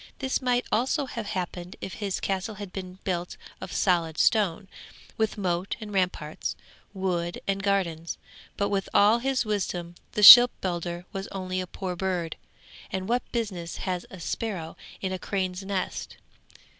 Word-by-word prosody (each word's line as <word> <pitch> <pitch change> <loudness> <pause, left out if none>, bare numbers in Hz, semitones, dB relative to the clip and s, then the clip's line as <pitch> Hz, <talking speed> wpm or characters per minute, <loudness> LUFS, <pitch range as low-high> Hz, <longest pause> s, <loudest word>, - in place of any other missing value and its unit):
This 265 0 -1
might 250 -1 +1
also 265 +6 +1
have 230 -4 -5
happened 180 -1 -4
if 190 - -6
his 200 -3 -3
castle 195 +3 -2
had 200 -2 -8
been 185 -1 -7
built 180 -2 -3 0.2
of 190 - -6
solid 170 -4 +1
stone, 205 -3 +2 0.5
with 220 -1 0
moat 180 -1 -1
and 210 -2 -7
ramparts, 180 -5 -1 0.4
wood 180 -3 -2
and 195 0 0
gardens. 175 -5 -1 0.4
But 200 0 +1
with 195 -1 -1
all 210 +3 +6
his 265 0 0
wisdom 180 -5 -2 0.2
the 210 - 0
shipbuilder 180 -7 +8
was 195 0 -4
only 185 -1 -3
a 185 - -5
poor 185 0 -5
bird, 175 -3 -2 0.6
and 190 0 -3
what 245 +2 -1
business 195 -8 -3
has 180 -2 -2
a 190 - -10
sparrow 175 -2 -4 0.3
in 190 - -2
a 185 - -3
crane's 185 -1 -2
nest? 195 -1 -3
190 Hz, 155 wpm, -27 LUFS, 180-210 Hz, 0.6 s, shipbuilder